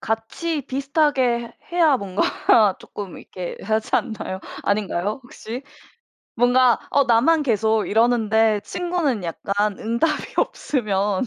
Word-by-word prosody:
같이 275 +8 -3
비슷하게 270 -4 0
해야 325 -6 +4
뭔가 200 0 +2
쪼끔 200 -4 -8
이렇게 180 -2 -7
하지 220 +1 -1
않나요? 215 -5 -2 0.2
아닌가요, 205 +2 -1
혹시? 245 +1 -8 0.7
뭔가 245 +1 +4
어 280 -1 +3
나만 275 +7 +3
계속 220 -3 +1
이러는데 220 -1 +3
친구는 345 - -1
약간 200 +4 -2
응답이 235 +8 -1
없으면 210 -4 0
230 Hz, 255 characters per minute, -22 LUFS, 210-270 Hz, 0.7 s, 해야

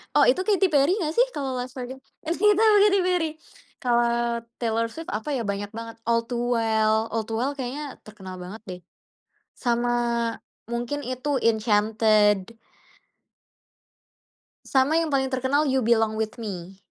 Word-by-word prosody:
Oh, - - +6
itu 370 - +2
Katy 395 -2 +4
Perry 285 +2 +4
nggak 315 -6 -2
sih - - +5
kalau 275 -2 -2
"Last 250 0 -5
Friday"? 255 0 -6 0.3
Gak 380 +6 +3
tau, 440 -1 +6
Katy 400 -1 +4
Perry. 360 -3 +1 0.6
Kalau 235 -1 +1 0.2
Taylor 230 -1 0
Swift 325 +6 -7
apa 215 +7 -3
ya 250 - -1
banyak 200 0 -3
banget 230 0 -7
"All 230 0 +3
To 245 - -2 0.2
Well," 220 -1 +2 0.2
"All 225 0 -1
To 225 - -5
Well" 255 +5 0
kayaknya 275 +2 -5
terkenal 190 -3 -10
banget 185 +5 -8
deh 180 -1 -6 0.8
sama 240 -1 0 0.8
mungkin 240 +5 -3
itu 255 +3 -1
"Enchanted." 215 -1 +2 2.1
Sama 270 +4 +2
yang 330 -1 +1
paling 265 -1 +1
terkenal 270 +3 +1
You 260 -3 +1
Belong 225 -2 +2
with 220 +2 -3
Me. 190 -3 -6
240 Hz, 150 wpm, -25 LUFS, 220-285 Hz, 2.1 s, Oh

